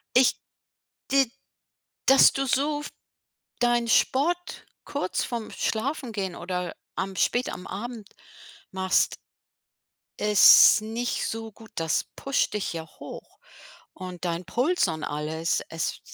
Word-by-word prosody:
Ich 255 0 +4 0.7
die 270 -3 +3 0.8
dass 270 0 +7
du 270 - -1
so 290 +3 0
f 295 - -7 0.7
deinen 240 -1 +2
Sport 340 +10 +1 0.2
kurz 280 -10 -2
vorm 235 -3 -5
Schlafengehen 220 - -3
oder 180 0 -4 0.2
am 190 0 -3
spät 245 +6 +1
am 180 - -8
Abend 225 0 -7 0.6
machst 190 0 +1 1.0
ist 210 +1 +7
nicht 230 +3 -2
so 225 0 -5
gut, 220 +1 -16
das 165 -2 0
pusht 275 0 0
dich 210 -4 -2
ja 165 -1 -5
hoch - - -10 0.5
und 180 -2 -8
dein 170 +1 -2
Puls 255 - +1
und 160 -1 -4
alles. 155 +3 -2
Es 165 0 -3
220 Hz, 120 wpm, -26 LUFS, 180-255 Hz, 1.0 s, dass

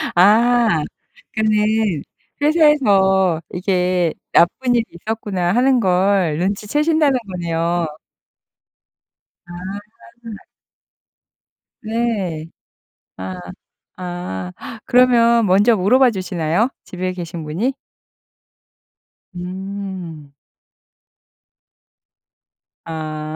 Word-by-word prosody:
아 220 -1 +4 0.5
그 220 - -1 1.0
회사에서 200 - +3
이게 180 -2 0 0.2
'나쁜 245 +9 +3
일이 235 - +2
있었구나.' 190 -1 -3
하는 255 +1 +3
걸 185 -4 +2
눈치 200 +3 -2
채신다는 300 +1 +2
거네요. 170 -1 -1 1.6
아. 205 +5 -10 1.3
네. 215 -8 -2 0.7
아. 95 0 -6 0.6
아. 175 - -5 0.3
그러면 235 -2 +4
먼저 205 +5 +4
물어봐 245 +7 +4
주시나요? 180 +2 -1 0.2
집에 185 0 -4
계신 170 -2 -6
분이? 180 - -2 1.6
음. 180 -4 -7 2.5
아. 155 -1 -5
190 Hz, 135 characters per minute, -19 LUFS, 175-230 Hz, 2.5 s, 아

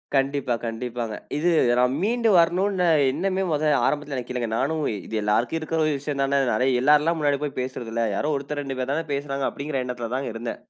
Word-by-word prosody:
கண்டிப்பா, 135 -2 +1
கண்டிப்பாங்க, 115 -1 -4 0.2
இது 175 +4 +2 0.3
நா - - +5 0.2
மீண்டு 230 +1 +2
வரணுனு 180 +2 +2 0.2
எண்ணமே 190 +6 -1
மொத 150 0 0 0.2
ஆரம்பத்தில 145 -1 -2
எனக்கு 125 0 -5
இல்லங்க. 120 -3 -2
நானும் 155 +3 0 0.3
"இது 110 -1 -2
எல்லாருக்கு 115 +8 +1
இருக்கிற 160 +1 -2
ஒரு 155 - +2
விஷயம் 145 0 -4
தான 140 0 +2 0.2
அது 130 +1 +3
எல்லாருல்லா 150 +4 +4
முன்னாடி 145 -2 +1
போய் 145 - -4
பேசுறது 125 -3 -5
இல்ல. 115 0 0
யாரோ 150 +6 0
1த்தர் 145 +1 -4
2 135 -1 -5
பேர் 130 +2 -1
தானே 160 +1 -2
பேசுறாங்க" 140 -1 -2
அப்டிங்கற 140 -2 -3
எண்ணத்தில 120 -2 -5
தான்ங்க 130 -4 -3
இருந்தே. 115 +1 -4
140 Hz, 190 wpm, -24 LUFS, 125-155 Hz, 0.3 s, நா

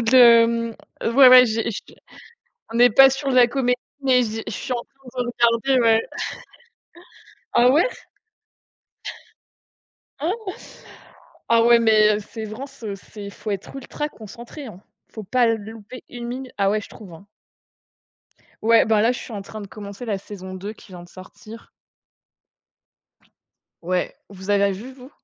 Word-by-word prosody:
de 230 +3 +2
hem, 230 -1 +5 0.3
ouais, 255 +3 +6
ouais 255 0 +9
j'ai 225 0 -2
j'ai 200 - -9 0.8
on 230 - -3
n'est 245 +1 +6
pas 270 +5 +8
sur 270 +1 -3
de 255 - 0
la 245 - +7
comédie, 250 0 0 0.2
mais 255 -2 +3
je 225 0 -5
je - - -5
suis 255 - -5
en 240 - -1
train 260 -2 -8
de 240 - -5
regarder, 240 +2 +2
ouais. 225 -1 +4 1.5
Ah 240 +1 +5
ouais? 305 - +4 2.3
Oh! 375 +6 -3 1.0
Ah 230 0 +4
ouais 235 0 +6
mais 215 -2 +4
heu, - - -4
Severance, 225 +6 -9
heu, 205 -2 -4
c'est 200 +1 -10
faut 210 - -7
être 200 -1 -5
ultra 295 +3 -5
concentré, 235 +4 -11
hein, 195 -4 -12 0.3
faut 220 - -9
pas 245 +5 +2
louper 225 +1 -5
1 240 -1 -8
minute. 255 +1 -7
Ah 195 -1 +2
ouais, 215 +1 0
je - - -12
trouve, 200 -5 -13
hein. 165 +5 -15 1.4
Ouais, 230 +1 +5
bah 220 -1 +3
là 230 - +3
je 250 - -6
suis - - -10
en 205 - -5
train 215 +2 -9
de - - -8
commencer 200 +2 -9
la 210 -3 -1
saison 190 -1 -10
2 195 +3 -6
qui 210 - -18
vient 175 -1 -10
de 175 - -15
sortir. 215 +5 -13 2.1
Ouais, 180 +1 -2
vous 190 0 -8
avez 200 0 +3
vu 225 +8 -9
vous? 260 0 -14
230 Hz, 160 wpm, -22 LUFS, 210-250 Hz, 2.3 s, ouais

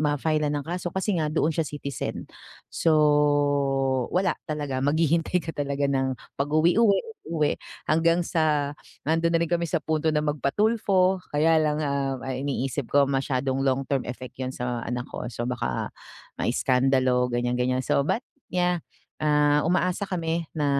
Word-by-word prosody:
ma-file-lan 150 0 +1
ng - - -19
kaso 175 +1 -3
kasi 190 -1 0
nga 155 - +1
doon 155 +1 +1
siya 160 0 -1
citizen. 140 -3 -5 0.5
So, 165 - +2 1.2
wala 185 0 +3 0.2
talaga, 145 -3 -2
maghihintay 165 +3 +2
ka 165 - -3
talaga 140 0 -1
ng 135 -1 0 0.3
pag-uwi 155 +7 +3
uwi 205 -4 +4 0.3
uwi 155 -3 +1 0.4
hanggang 165 +2 +3
sa 155 -4 +1 0.3
nando'n 165 +2 +1
na - - +5
rin 170 - -2
kami 170 -1 +1
sa 165 -1 -1
punto 155 0 0
na 150 - +2
magpa-Tulfo, 190 +5 +2 0.2
kaya 160 +2 +4
lang, 155 0 +1
ah, 140 -2 -1
ang 130 -1 -3
iniisip 135 -1 -2
ko 145 0 +4
masyadong 135 0 0
long 135 +1 +2
term 135 -2 0
effect 125 +1 -8
'yun 130 -1 -3
sa 125 -1 -3
anak 125 +1 -3
ko, - - -5
so 120 0 -5
baka 65 - -2 0.5
maiskandalo, 130 0 +2
ganiyan, 120 0 0
ganiyan. 130 +1 +1
So 140 - +2
but 240 - 0 0.3
yeah, 180 -1 +1 0.4
ah, 150 -1 +3
umaasa 180 +2 +1
kami 165 -2 -2
na 150 -2 0
150 Hz, 155 wpm, -25 LUFS, 135-165 Hz, 1.2 s, na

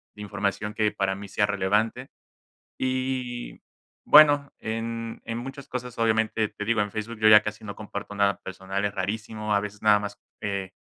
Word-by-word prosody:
de 105 - -10
información 105 +1 -2
que, 105 -1 +1
para 95 -1 -1
mí 100 +1 -8
sea 105 - +2
relevante 105 +5 0 0.7
y, 130 -1 -2 0.4
bueno, 145 -2 +7
en 115 +1 -4
en 115 0 -3
muchas 135 +3 -7
cosas 125 -2 -6
obviamente, 110 -1 +2
te 105 - -6
digo 115 0 +1
en 105 -1 -2
Facebook 110 +2 -5
yo 110 - +4
ya 105 -1 +9
casi 105 0 -5
no 100 - -6
comparto 105 -1 -7
nada 100 -1 +2
personal, 95 +1 -4
es 100 - -1
rarísimo, 105 +2 -3
a 100 - +4
veces 105 0 -7
nada 105 -1 +6
más, 100 0 -6 0.2
eh, 100 -2 -3
105 Hz, 175 wpm, -26 LUFS, 100-115 Hz, 0.7 s, ya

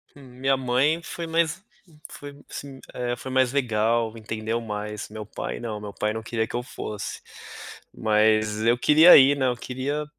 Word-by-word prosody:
Hum, 140 - -14 0.2
minha 135 +1 +2
mãe 130 +6 +1
foi 170 0 -6
mais 165 +2 0 0.5
foi 145 0 -10
assim, 140 -1 -8
eh, 120 0 -2
foi 130 +3 -8
mais 130 -1 +2
legal, 115 -3 0
entendeu 110 +1 -3
mais. 105 -1 -5
Meu 110 0 -8
pai - - -6
não, 110 -3 -5
meu 105 -1 -8
pai 105 0 -1
não 110 - -4
queria 110 0 -2
que - - -7
eu 120 - -2
fosse. 105 -4 -6 0.7
Mas 110 0 +2
eu 120 +2 +3
queria 155 +7 +8
ir, 140 +1 +6
né, 130 - +1
eu 125 - 0
queria 135 +5 -4
120 Hz, 175 wpm, -24 LUFS, 110-135 Hz, 0.7 s, queria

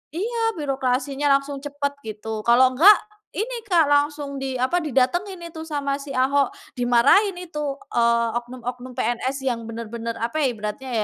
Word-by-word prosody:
Iya, 460 +5 -2 0.2
birokrasinya 275 0 -1
langsung 280 0 -7
cepet 285 0 -3
gitu. 215 +1 -5
Kalau 255 +2 +6
enggak, 390 +10 +8 0.4
ini, 465 +2 -4
Kak. 335 -6 +4
Langsung 290 -1 +1
di 265 -1 -3
apa, 305 +8 +2
didatengin 345 - 0
itu 320 0 -7
sama 285 -3 -2
si 275 - -8
Ahok. 275 +2 +2 0.3
Dimarahin 250 - +4
itu, 335 -4 -7 0.4
eee, 235 0 +3
oknum-oknum 250 +1 -6
PNS 255 +3 -1
yang 235 -2 -1
bener-bener 230 0 -5
apa 235 +7 -2
ya - - +4
ibaratnya 215 +4 -6
275 Hz, 145 wpm, -23 LUFS, 240-300 Hz, 0.4 s, enggak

